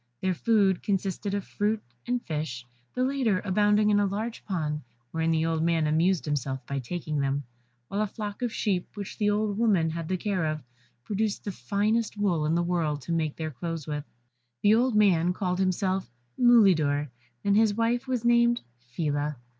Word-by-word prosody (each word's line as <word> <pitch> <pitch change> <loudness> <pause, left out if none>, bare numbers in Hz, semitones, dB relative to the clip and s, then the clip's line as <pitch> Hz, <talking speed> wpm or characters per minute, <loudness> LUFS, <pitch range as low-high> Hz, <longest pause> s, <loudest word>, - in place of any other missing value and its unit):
Their 190 -1 0
food 200 -2 +2
consisted 195 0 -1
of 200 - -2
fruit 210 +1 0 0.3
and 245 0 -1
fish, 150 -6 -4 0.3
the 255 - +1
latter 255 -7 +1
abounding 210 +2 +3
in 205 - +4
a 205 - +2
large 220 +4 -4
pond, 155 -6 -2 0.3
wherein 165 0 0
the 160 0 +2
old 165 -1 0
man 165 -1 +2
amused 165 +4 +2
himself 135 -3 -2
by 140 +1 -3
taking 155 +3 -3
them; 140 +1 0 0.4
while 200 - -2
a 215 - +1
flock 205 +1 -6
of 245 -2 0
sheep 190 -4 -1
which 205 +1 -7
the 210 -1 +3
old 210 0 0
woman 190 -9 +3
had 165 0 -4
the 185 - 0
care 185 -4 -1
of, 155 -1 -3 0.4
produced 210 0 -1
the 205 - -3
finest 205 - 0
wool 175 -7 +1
in 160 - +1
the 175 - +2
world 160 -5 -1
to - - -5
make 160 -3 0
their 155 -1 -4
clothes 165 +3 -5
with. 150 -1 -3 0.6
The 205 - +6
old 240 +1 +3
man 180 -5 +4
called 180 -1 -2
himself 190 0 0 0.3
Mulidor, 170 - +4 0.3
and 200 0 +3
his 215 -1 +4
wife 235 +3 0
was 250 -3 -1
named 235 0 +4 0.2
Phila. 145 +4 -2
185 Hz, 185 wpm, -27 LUFS, 155-210 Hz, 0.6 s, The